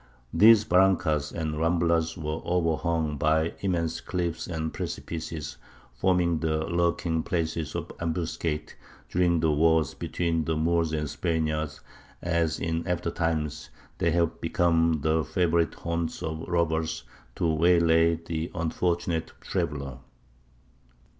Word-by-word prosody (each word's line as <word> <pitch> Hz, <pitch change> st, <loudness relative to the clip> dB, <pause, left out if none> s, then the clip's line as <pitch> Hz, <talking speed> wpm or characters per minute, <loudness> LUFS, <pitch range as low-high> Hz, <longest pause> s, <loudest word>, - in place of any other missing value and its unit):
These 110 Hz, +4 st, +7 dB
barrancas 90 Hz, -6 st, +2 dB
and 80 Hz, -2 st, -3 dB
ramblas 85 Hz, 0 st, +1 dB
were 75 Hz, +1 st, -3 dB
overhung 85 Hz, -3 st, 0 dB
by 80 Hz, +2 st, +2 dB
immense 85 Hz, -4 st, -1 dB
cliffs 85 Hz, -3 st, -3 dB
and 80 Hz, -2 st, -3 dB
precipices, 80 Hz, -3 st, -5 dB, 0.4 s
forming 85 Hz, +3 st, +2 dB
the 80 Hz, 0 st, 0 dB
lurking 85 Hz, -1 st, 0 dB
places 80 Hz, -3 st, -2 dB
of -, -, -4 dB
ambuscades 80 Hz, -2 st, -2 dB, 0.4 s
during 85 Hz, -2 st, +2 dB
the 80 Hz, -1 st, +3 dB
wars 80 Hz, -1 st, +3 dB
between 85 Hz, -2 st, -1 dB
the 80 Hz, -, 0 dB
Moors 85 Hz, 0 st, +1 dB
and 75 Hz, -1 st, -1 dB
Spaniards, 80 Hz, -2 st, -2 dB, 0.4 s
as 85 Hz, -2 st, 0 dB
in 80 Hz, 0 st, -2 dB
after 85 Hz, -1 st, -1 dB
times 80 Hz, -3 st, -2 dB, 0.3 s
they 85 Hz, -, +2 dB
have 85 Hz, 0 st, 0 dB
become 80 Hz, -2 st, +2 dB
the 80 Hz, 0 st, +2 dB
favourite 85 Hz, -2 st, +1 dB
haunts 85 Hz, -1 st, -3 dB
of 80 Hz, 0 st, -4 dB
robbers 80 Hz, -5 st, 0 dB, 0.3 s
to -, -, -1 dB
waylay 85 Hz, 0 st, +4 dB
the 80 Hz, 0 st, -4 dB
unfortunate 85 Hz, 0 st, -1 dB
traveller. 70 Hz, -3 st, -3 dB
80 Hz, 120 wpm, -27 LUFS, 80-85 Hz, 0.4 s, These